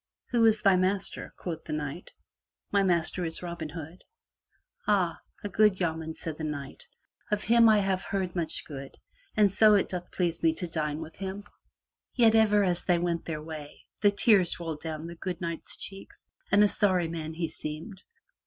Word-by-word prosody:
"Who 235 -2 +3
is 220 -1 +2
thy 195 -2 +6
master?" 185 +1 -1
quoth 165 -3 -5
then 155 - -2
the 150 - -2
knight. 145 +5 -7 0.6
"My 200 - +4
master 180 -1 +1
is 165 +1 -4
Robin 170 -3 -5
Hood." 165 +2 -9 0.8
"Ah, 190 -5 +2 0.2
a - - -1
good 210 -1 +3
yeoman," 160 -2 -2
said 160 -2 -5
the - - -4
knight. 145 -3 -6 0.4
"Of 210 0 0
him 230 0 +6
I 215 - +6
have 195 -2 +1
heard 190 -2 -3
much 170 -2 -2
good 140 -2 -9 0.4
and 205 -2 +5
so 210 +1 +6
doth 180 -1 -5
it - - -34
please 175 -2 -1
me 165 -1 +4
to 180 - -4
dine 155 -2 -2
with 160 0 -9
him." 195 +1 -5 0.7
Yet 230 -3 +5
ever 210 -2 +5
as 175 -2 0
they 175 -2 +3
went 170 -1 -1
their 155 -2 -4
way, 155 -2 -9 0.2
the 205 - +6
tears 200 -4 +3
rolled 160 -3 -5
down 160 -1 -5
the 170 - -6
good 175 0 -5
Knight's 170 -2 -4
cheeks, 195 0 -9 0.2
and 205 +1 +6
a - - +6
sorry 185 -4 +2
man 160 -1 -5
he 165 0 -1
seemed. 160 +8 -7
175 Hz, 190 wpm, -28 LUFS, 160-200 Hz, 0.8 s, thy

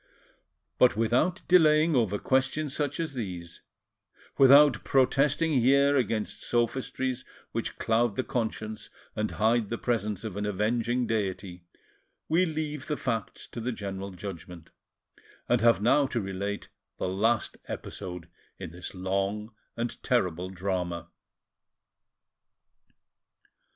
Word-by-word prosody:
But 125 -4 +5
without 125 +11 +1
delaying 160 -3 +5
over 110 -5 +2
questions 135 +4 0
such 145 0 -2
as 160 -3 -2
these, 90 -8 -6 0.7
without 140 -2 +7
protesting 140 +4 +2
here 140 +3 +4
against 115 -5 -1
sophistries 130 +1 -1 0.3
which - - -3
cloud 115 -1 +1
the 130 - 0
conscience 110 -3 -4 0.3
and 110 0 -1
hide 110 0 +1
the 115 - -2
presence 105 -5 -1
of 110 -4 -5
an 105 0 -2
avenging 115 +4 0
Deity, 95 -5 -3 0.6
we 175 +3 +3
leave 150 -3 -4
the 150 - -1
facts 115 -5 -3
to - - -7
the 125 +3 -2
general 100 -3 -5
judgment, 90 -3 -9 0.8
and - - +2
have 115 -3 +4
now 135 +4 +4
to 120 - -2
relate 100 0 -4 0.3
the - - -2
last 110 +5 0
episode 90 -3 -6 0.3
in 90 -4 -7
this 90 +2 -8
long 100 +4 -2 0.2
and 120 0 -3
terrible 90 -7 0
drama. 90 -2 -3
115 Hz, 120 wpm, -28 LUFS, 100-130 Hz, 0.8 s, without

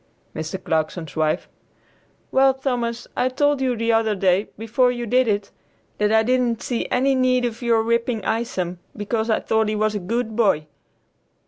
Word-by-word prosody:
Mr. 160 +4 -4
Clarkson's 160 +1 -2
wife. 155 -1 0 0.8
"Well, 265 0 +4
Thomas, 240 -3 -2
I 255 - +1
told 290 +1 +1
you 255 -2 +1
the 230 0 0
other 225 -1 +2
day, 190 +1 +2
before 230 +3 +2
you 240 -1 -4
did 250 +2 +2
it, 205 -2 -1 0.5
that 210 0 +2
I 220 0 +4
didn't 245 -1 +1
see 240 -2 -2
any 270 +2 +2
need 255 -1 +2
of 235 0 -4
your 230 -2 +2
whipping 235 -2 0
Isom, 185 -6 -2 0.2
because 220 +2 -2
I 220 - +2
thought 220 -1 +1
he 215 - -1
was 215 0 +1
a 210 - -2
good 220 +4 -2
boy." 200 -10 +2
230 Hz, 175 wpm, -22 LUFS, 210-250 Hz, 0.8 s, Well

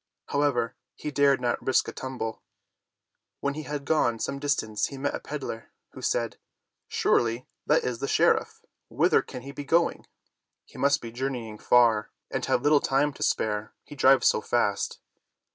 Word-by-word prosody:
However, 135 -5 +1 0.2
he 150 - -5
dared 140 -1 +4
not 120 -1 -1
risk 130 - +2
a - - -3
tum 130 0 -6
ble. 110 -1 -4 1.0
When 140 - -1
he 155 - -5
had 145 -2 -5
gone 130 -8 +2
some 140 +5 -3
distance 140 -7 0
he 140 - -9
met 145 +2 -1
a - - -3
peddler, 135 -6 -6 0.2
who - - -11
said: - - -1 0.5
"Surely, 120 +2 +1 0.2
that 150 - +4
is 125 -2 -2
the 140 - -2
sheriff. - - +2 0.2
Whither - - +3
can 125 - -9
he 140 - -7
be 145 +1 -7
going? 170 +4 +1 0.6
He - - -14
must 140 0 +3
be 115 - -7
journeying 120 -4 -4
far 115 -3 +4 0.2
and - - -2
have 120 - +1
little 145 -1 +5
time 140 +2 +1
to - - -14
spare, 105 0 -1
he - - -11
drives 135 -1 +5
so - - +4
fast." 105 -4 0
130 Hz, 175 wpm, -27 LUFS, 115-145 Hz, 1.0 s, little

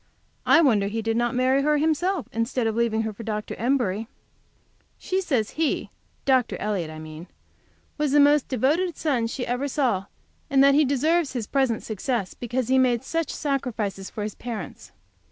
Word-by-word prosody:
I 335 - +7
wonder 215 -10 +3
he 220 +2 -3
did 225 0 0
not 240 +2 0
marry 260 +2 +3
her 300 +1 +2
himself, 320 +2 0
instead 230 +2 -1
of 220 -1 0
leaving 225 -1 +1
her 220 -1 -3
for 205 - -10
Dr. 215 -1 -4
Embury! 230 -4 0 0.9
She 375 +1 -1
says 255 - 0
he, 320 -2 -1 0.3
Dr. 260 -3 +2
Elliott, 200 -6 -2
I 155 - -8
mean, 155 +2 -9 0.7
was 300 -2 +1
the 295 - +5
most 290 0 +5
devoted 305 +8 0
son 255 -7 0
she 245 +2 -4
ever 250 +4 -1
saw, 250 -9 0 0.4
and 275 0 +5
that 275 0 +6
he 300 +1 +4
deserves 295 +3 +1
his 240 -4 -3
present 260 -3 0
success 220 -1 -2
because 245 0 -3
he 260 +1 +3
has - - +5
made 245 -2 +2
such 330 +2 -2
sacrifices 235 -9 -3
for 210 - -5
his 210 -1 -4
parents. 220 - -7
250 Hz, 180 wpm, -25 LUFS, 220-280 Hz, 0.9 s, I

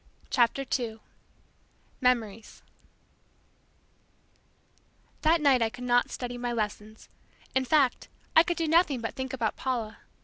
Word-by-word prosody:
CHAPTER 250 +2 +2
TWO 235 -4 -2 1.0
MEMORIES 225 -4 -1 2.6
That 330 +2 +4
night 270 -4 +4
I 225 - +2
could 245 +2 -10
not 245 0 +2
study 245 -1 -5
my 245 0 -2
lessons. 215 -1 -4 0.5
In 265 0 +1
fact, 275 -2 +2 0.3
I 320 - +9
could 345 +1 -1
do 330 - 0
nothing 320 -4 +3
but 225 - -4
think 260 0 -5
about 235 -5 -2
Paula! 235 -5 -3
245 Hz, 125 wpm, -28 LUFS, 225-275 Hz, 2.6 s, I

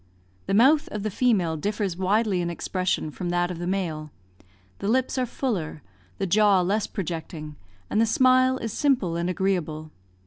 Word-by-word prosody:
The 195 - +1
mouth 275 +7 +5
of 210 -1 -5
the 215 - -2
female 195 -8 +2
differs 200 +2 -2
widely 195 +1 +1
in 170 - -2
expression 180 -1 -2
from 175 +3 -5
that 175 0 0
of 170 - -6
the 175 - -3
male; 165 -5 -2 0.7
the 200 - -3
lips 255 +4 +1
are 250 - 0
fuller, 185 - -3 0.3
the - - -1
jaw 200 0 +4
less 200 +4 0
projecting, 160 -4 -5 0.3
and 215 - +1
the 230 - +3
smile 255 +2 +4
is 225 -4 -4
simple 250 - +1
and 170 +1 -1
agreeable. 170 -5 -2
190 Hz, 170 wpm, -25 LUFS, 170-220 Hz, 0.7 s, mouth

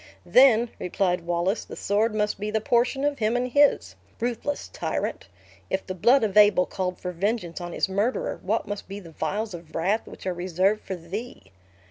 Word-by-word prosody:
"Then," 245 -3 +5
replied 180 -1 -1
Wallace, 175 +5 0
"the - - -9
sword 215 +2 0
must 210 -2 0
be 210 +1 -3
the 220 +1 0
portion 245 +4 +1
of 290 -2 0
him 220 +1 +1
and 250 +1 0
his! 285 +3 +3 0.3
Ruthless 245 +4 -2
tyrant! - - -3 0.4
If 190 - -2
the 185 - -4
blood 235 +9 +4
of 210 -3 -1
Abel 205 -3 +6
called 185 -1 -3
for 180 - -5
vengeance 180 -1 -2
on 175 0 -5
his - - 0
murderer, 205 +6 -1
what 215 +5 -1
must 205 0 -5
be 195 +2 -6
the 170 -5 -12
vials 200 +7 -3
of 165 -2 -10
wrath 195 +7 0
which - - -11
are 185 - 0
reserved 185 +4 0
for 190 - -5
thee?" 175 - -8
205 Hz, 190 wpm, -25 LUFS, 180-230 Hz, 0.4 s, Abel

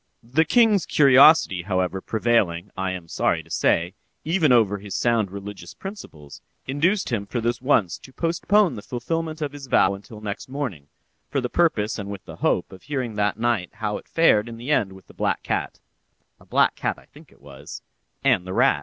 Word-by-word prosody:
The 135 +8 +1
king's 225 -4 +3
curiosity, 140 - +6
however, 95 0 -1
prevailing, 105 -6 0
I 95 0 -2
am 90 -3 -6
sorry - - 0
to - - -19
say, 85 +2 +1 0.3
even 160 -3 +2
over 105 -5 +3
his 100 0 -7
sound 115 -4 +1
religious 100 -2 -9
principles, 80 - -10 0.2
induced 165 +7 0
him 100 -4 -2
for 120 - -3
this 120 +1 -1
once 110 - +1
to 130 - -14
postpone 170 +4 +1
the 105 - -7
fulfilment 155 +7 -4
of 145 - -3
his 140 -2 -10
vow 100 -5 +3
until 105 +2 -10
next 105 +3 -6
morning, 125 - -5 0.4
for 140 - 0
the 125 -1 -3
purpose 115 -12 +1
and 100 -1 -6
with 100 -1 -8
the - - -10
hope - - 0
of 95 - -12
hearing 130 -5 -3
that 105 -1 0
night 115 -6 0
how 105 - -3
it - - -19
fared 120 -9 +3
in 115 - -8
the 120 +6 -5
end 105 -9 +2
with 95 -1 -15
the - - -17
black - - -1
cat - - -3 0.6
(a - - -21
black - - +3
cat, - - -2
I - - -18
think - - -18
it - - -23
was) 70 0 -11 0.4
and 90 - +2
the 95 - -4
rat. - - +3
115 Hz, 200 wpm, -23 LUFS, 95-145 Hz, 0.6 s, curiosity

